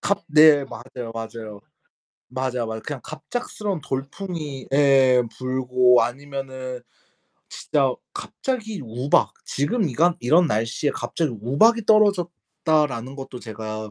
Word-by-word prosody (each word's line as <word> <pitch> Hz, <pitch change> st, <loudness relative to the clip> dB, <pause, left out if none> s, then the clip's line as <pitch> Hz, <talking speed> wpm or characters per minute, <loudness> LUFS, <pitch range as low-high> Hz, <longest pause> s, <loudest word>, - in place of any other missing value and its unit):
갑 200 Hz, -3 st, -1 dB
네 150 Hz, -2 st, +6 dB
맞아요, 120 Hz, -1 st, -8 dB
맞아요. 110 Hz, -2 st, -7 dB, 0.7 s
맞아, 125 Hz, -2 st, -2 dB
맞아. 110 Hz, 0 st, -5 dB
그냥 140 Hz, +1 st, -6 dB
갑작스러운 185 Hz, +3 st, -5 dB
돌풍이 140 Hz, +1 st, -5 dB
예 135 Hz, -3 st, +5 dB
불고 125 Hz, -1 st, +3 dB
아니면은 130 Hz, -1 st, -6 dB, 0.7 s
진짜 135 Hz, -4 st, 0 dB, 0.2 s
갑자기 220 Hz, -, -4 dB
우박 125 Hz, +5 st, +1 dB
"지금 160 Hz, -, 0 dB
이간 165 Hz, +7 st, +2 dB
이런 165 Hz, +8 st, +4 dB
날씨에 115 Hz, +3 st, 0 dB
갑자기 160 Hz, -6 st, -2 dB
우박이 215 Hz, -, +3 dB
떨어졌다."라는 160 Hz, -, +1 dB
것도 135 Hz, -2 st, -8 dB
제가 110 Hz, -1 st, -6 dB
135 Hz, 265 characters per minute, -23 LUFS, 125-160 Hz, 0.7 s, 네